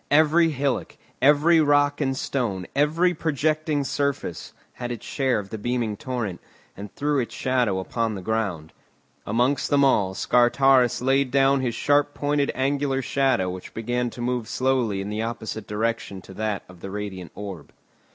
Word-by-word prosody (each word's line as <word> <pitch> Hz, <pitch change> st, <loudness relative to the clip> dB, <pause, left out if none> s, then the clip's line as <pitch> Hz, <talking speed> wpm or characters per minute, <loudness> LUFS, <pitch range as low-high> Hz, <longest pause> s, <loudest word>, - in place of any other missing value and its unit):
Every 160 Hz, +3 st, +4 dB
hillock, 140 Hz, -4 st, -2 dB, 0.2 s
every 150 Hz, +4 st, +5 dB
rock 145 Hz, 0 st, +3 dB
and 135 Hz, -2 st, 0 dB
stone, 110 Hz, -11 st, -2 dB
every 160 Hz, +5 st, +3 dB
projecting 155 Hz, -1 st, 0 dB
surface, 140 Hz, -, -2 dB, 0.2 s
had 120 Hz, -1 st, -5 dB
its 120 Hz, -, -6 dB
share 135 Hz, -4 st, 0 dB
of 100 Hz, -2 st, -6 dB
the 110 Hz, -, -5 dB
beaming 120 Hz, -1 st, -1 dB
torrent, 115 Hz, -6 st, -4 dB, 0.3 s
and 100 Hz, +1 st, -8 dB
threw 145 Hz, 0 st, 0 dB
its 115 Hz, -3 st, -3 dB
shadow 115 Hz, -8 st, 0 dB
on 115 Hz, -2 st, 0 dB
the 95 Hz, -, -7 dB
ground. 95 Hz, -8 st, -2 dB, 0.5 s
Amongst 125 Hz, +6 st, +1 dB
them 140 Hz, -1 st, +4 dB
all, 95 Hz, -8 st, +2 dB
Scartaris 125 Hz, +2 st, +3 dB
laid 135 Hz, +1 st, +2 dB
down 135 Hz, +1 st, +3 dB
his 120 Hz, -3 st, -1 dB
sharp 145 Hz, +2 st, +2 dB
pointed 145 Hz, -1 st, 0 dB
angular 135 Hz, 0 st, 0 dB
shadow 130 Hz, -10 st, +1 dB
which 90 Hz, 0 st, -9 dB
began 120 Hz, +2 st, -1 dB
to 120 Hz, -, -9 dB
move 120 Hz, -2 st, -1 dB
slowly 125 Hz, -6 st, 0 dB
in 100 Hz, -, -5 dB
the 105 Hz, +1 st, -2 dB
opposite 110 Hz, -2 st, -5 dB
direction 110 Hz, -2 st, -2 dB
to 95 Hz, -, -12 dB
that 105 Hz, 0 st, -2 dB
of 90 Hz, -1 st, -15 dB
the 95 Hz, -, -7 dB
radiant 95 Hz, -3 st, -6 dB
orb. 100 Hz, -4 st, -8 dB
125 Hz, 160 wpm, -24 LUFS, 105-140 Hz, 0.5 s, every